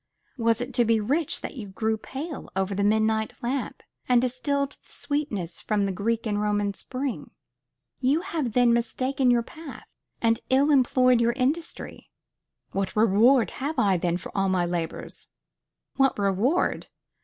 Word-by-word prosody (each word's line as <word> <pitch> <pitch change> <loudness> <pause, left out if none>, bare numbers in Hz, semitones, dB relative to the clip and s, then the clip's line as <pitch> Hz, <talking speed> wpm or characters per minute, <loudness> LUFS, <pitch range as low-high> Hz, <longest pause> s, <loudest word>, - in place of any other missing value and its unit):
Was 230 0 +2
it 250 +1 -5
to 245 -1 +4
be 225 -1 +3
rich 280 +9 -1
that - - -7
you 215 -4 -6
grew 220 +3 -1
pale 275 +7 -7
over 190 +1 0
the 200 +1 0
midnight 220 +1 +1
lamp, 255 +2 -3 0.3
and 250 -1 +6
distilled 280 +3 0
the - - -21
sweetness 215 - -3
from 210 -2 0
the 195 - -1
Greek 225 +5 -1
and 210 -1 0
Roman 205 -1 0
spring? 255 +5 -5 0.7
You 275 +5 +2
have 305 - -3
then 245 -1 +4
mistaken 255 +3 0
your 240 -1 +3
path, 315 +3 -11 0.3
and 230 -1 +2
ill 275 +3 +4
employed 255 -2 +4
your 235 0 +2
industry. 285 +7 -3 0.6
"What 195 0 -2
reward 225 +4 +4
have 295 +3 -2
I 200 -6 +3
then 175 0 0
for 185 - -10
all 195 -1 +1
my 185 -2 +1
labors?" 170 -2 -4 0.7
What 270 0 +3
reward! 205 - +1
235 Hz, 155 wpm, -26 LUFS, 205-265 Hz, 0.7 s, and